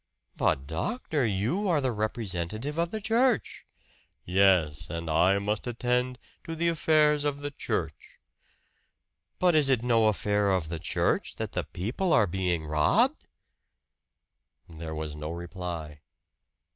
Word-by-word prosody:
"But, 65 - +1
doctor, 125 - -1
you 115 - 0
are 165 -4 +3
the 130 -2 0
representative 110 - -3
of 170 0 +1
the 220 - -4
church!" 230 +2 +1 0.6
"Yes. 90 -4 +3
And 85 0 -5
I 90 +5 +4
must 105 +4 -2
attend 125 +1 0 0.3
to 165 -1 -5
the 170 +1 +1
affairs 155 -2 +3
of 145 -1 -2
the 145 0 -4
church." - - -4 1.2
"But 180 -1 +3
is 150 -3 +4
it 125 -3 +2
no 115 -3 +3
affair 105 -1 +1
of 90 -5 0
the 85 -1 -4
church 85 - 0
that - - -4
the - - -2
people 125 - -2
are 110 - +5
being 90 -3 -1
robbed?" 75 0 +2 1.4
There 80 -1 -7
was 75 -1 -5
no 75 0 -5
reply. 85 -3 -6
105 Hz, 135 wpm, -28 LUFS, -, 1.4 s, are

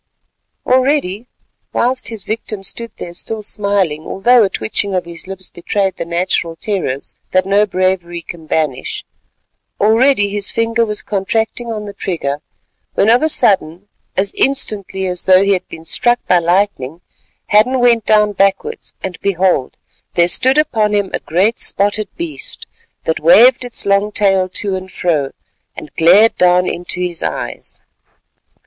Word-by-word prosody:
Already—whilst 255 -1 -1
his 220 -4 -7
victim 215 -2 -5
stood 230 +4 -3
there 170 - -7
still 215 +4 -5
smiling, 200 -7 -1
although 240 +5 +3
a 195 - +1
twitching 190 - -2
of 180 - -1
his 170 +1 -7
lips 190 -1 -8
betrayed 190 +2 -2
the 170 - -4
natural 170 -1 -1
terrors 165 -8 -4 0.2
that 185 0 +3
no 200 +2 +3
bravery 185 -3 -1
can 165 -2 -10
banish—already 205 - -1
his 200 0 -2
finger 230 0 0
was 210 -1 -2
contracting 225 +4 -2
on 210 -1 -5
the 200 - -8
trigger, 150 -8 -3 0.5
when 215 - +3
of 240 - +4
a 315 - +2
sudden, 200 - +1 0.3
as 195 +1 +1
instantly 200 -8 -1
as 180 -1 -1
though 185 0 +6
he 200 0 +3
had 185 - -2
been 160 - -10
struck 240 +8 +2
by 180 - +4
lightning, 170 -4 0 0.5
Hadden 220 +5 +4
went 235 -2 +3
down 210 -1 +3
backwards, 195 - -1
and 185 -1 -5
behold! 185 -8 0 0.4
there 170 0 +4
stood 260 +9 +3
upon 220 -8 +2
him 200 -2 -1
a - - -1
great 195 +8 0
spotted 205 +1 +1
beast 155 -5 -6 0.4
that 160 - -1
waved 235 +11 +6
its 245 -1 -4
long 200 +1 +2
tail 195 -3 +2
to 195 +1 -2
and 185 0 -7
fro 155 -8 0 0.5
and 145 - -10
glared 190 +7 +5
down 180 0 +4
into 175 0 -3
his 180 -2 -2
eyes. - - -5
195 Hz, 150 wpm, -16 LUFS, 175-215 Hz, 0.5 s, though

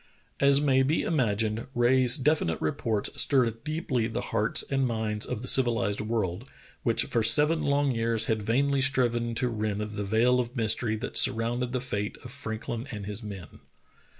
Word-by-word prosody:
" - - -40
As 140 0 +5
may 135 -2 +2
be 145 +5 +1
imagined, 115 -6 -1
Rae's 125 +2 +4
definite 140 - 0
reports 100 +7 -2
stirred 115 -5 +1
deeply 150 -7 -2
the 110 - -5
hearts 105 +2 +1
and 135 -1 0
minds 110 -2 -2
of 110 - -5
the - - -5
civilized 115 -6 +2
world, 105 -5 -3 0.3
which - - +2
for 115 - -1
seven 150 +9 +4
long 140 -1 +1
years 115 -1 0
had 110 -1 -1
vainly 135 +6 +1
striven 120 -3 +1
to 125 - 0
rend 105 -3 -3
the 105 -1 -5
veil 115 +5 +2
of 120 +1 -4
mystery 110 -1 -1
that 115 +4 -4
surrounded 120 0 +2
the 130 - -1
fate 105 -5 -4
of 125 - -10
Frank 115 -5 -7
lin 120 +3 -4
and 105 -4 -6
his 105 +2 -5
men. 100 -7 -9
115 Hz, 180 wpm, -27 LUFS, 110-130 Hz, 0.3 s, As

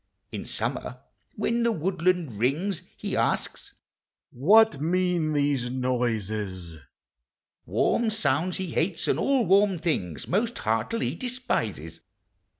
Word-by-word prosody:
In - - -5
summer - - -4 0.4
when 235 +1 0
the 235 0 +3
woodland 180 - 0
rings, 155 - 0 0.2
He - - -3
asks - - -1 0.3
" - - -67 0.2
What 190 - +5
mean 175 -1 +1
these 140 -4 +1
noises? 110 -9 -2 0.4
" 65 -1 -64
Warm 235 -1 +2
sounds 185 -5 0
he 185 -3 -4
hates 165 +2 -1
and - - +1
all 270 -4 +2
warm 195 +1 +4
things 90 - -2
Most 225 +6 0
heartily 115 - -1
despises. 250 0 -3
165 Hz, 120 wpm, -26 LUFS, 125-200 Hz, 0.4 s, What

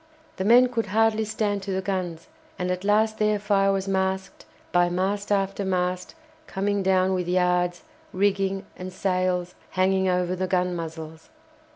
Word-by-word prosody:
The 190 - -2
men 245 +4 +7
could 235 -2 -2
hardly 220 +1 +2
stand 205 -1 -1
to 195 0 -5
the 190 0 -1
guns, 180 -4 -3 0.3
and 180 0 -1
at 180 +1 -3
last 215 +2 +2
their 210 0 +2
fire 200 -1 +2
was 195 0 -1
masked 190 0 -2 0.3
by 175 0 +3
mast 195 +3 -1
after 195 0 0
mast 180 -1 -2 0.3
coming 200 +1 -1
down 190 0 +2
with 180 -2 -1
yards, 180 -1 +1 0.3
rigging 195 0 0
and 185 0 -7
sails 185 -1 -1 0.2
hanging 190 0 +2
over 180 0 0
the 185 0 -2
gun 180 -1 0
muzzles. 160 -1 -7
190 Hz, 160 wpm, -25 LUFS, 180-200 Hz, 0.3 s, men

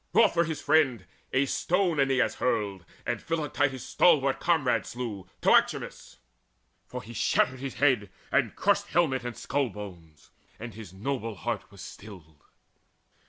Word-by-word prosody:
Wroth 230 - +5
for 170 0 +3
his 160 -1 -3
friend, 140 -10 +2 0.3
a 130 +1 +3
stone 175 +3 +1
Aeneas 135 -2 +2
hurled, 100 -7 -1 0.2
And - - -2
Philoctetes' 145 -5 -1
stalwart 140 -6 +3
comrade 160 -7 +1
slew, 115 -7 -5 0.2
Toxaechmes; - - +2 0.7
for 125 -1 -6
he 115 +4 -10
shattered 130 +3 +1
his 135 0 -5
head 125 -7 +2 0.2
and - - +2
crushed - - +2
Helmet 140 -6 +1
and 120 -2 -5
skull 140 -2 -1
bones; 90 -7 -11 0.3
and 115 0 -7
his 105 -4 -10
noble 115 +2 -3
heart 90 - -4
Was - - -13
stilled. 85 -8 -12
125 Hz, 140 wpm, -28 LUFS, 105-145 Hz, 0.7 s, Wroth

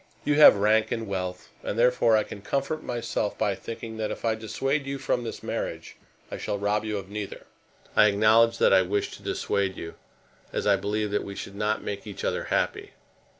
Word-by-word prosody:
You 145 - +3
have 150 -5 +9
rank 110 +2 +2
and 115 -1 -2
wealth, 90 -2 -4
and 105 - -4
therefore 120 -2 +4
I 110 - +2
can 100 - -9
comfort 140 +7 -2
myself 120 -3 -2
by 100 - +1
thinking 115 +2 -7
that 110 -1 -2
if - - -5
I 115 - +3
dissuade 135 +6 -2
you 140 0 -3
from 125 -2 -1
this 115 - -6
marriage - - -4 0.4
I - - -5
shall 100 - -2
rob 105 +1 0
you 105 -1 -2
of 95 0 -8
neither. 105 -1 -6 0.5
I 105 - +7
acknowledge 110 +3 +4
that - - +4
I 95 - +7
wish 100 +3 -1
to - - -11
dissuade 95 -2 -1
you, 80 - -7 0.6
as - - -2
I 100 -1 +5
believe 105 +2 -2
that 105 - 0
we 100 - -7
should 100 - -7
not 105 +1 -1
make 100 +1 -5
each 100 - -7
other - - -1
happy. - - -1
105 Hz, 205 wpm, -26 LUFS, 100-115 Hz, 0.6 s, have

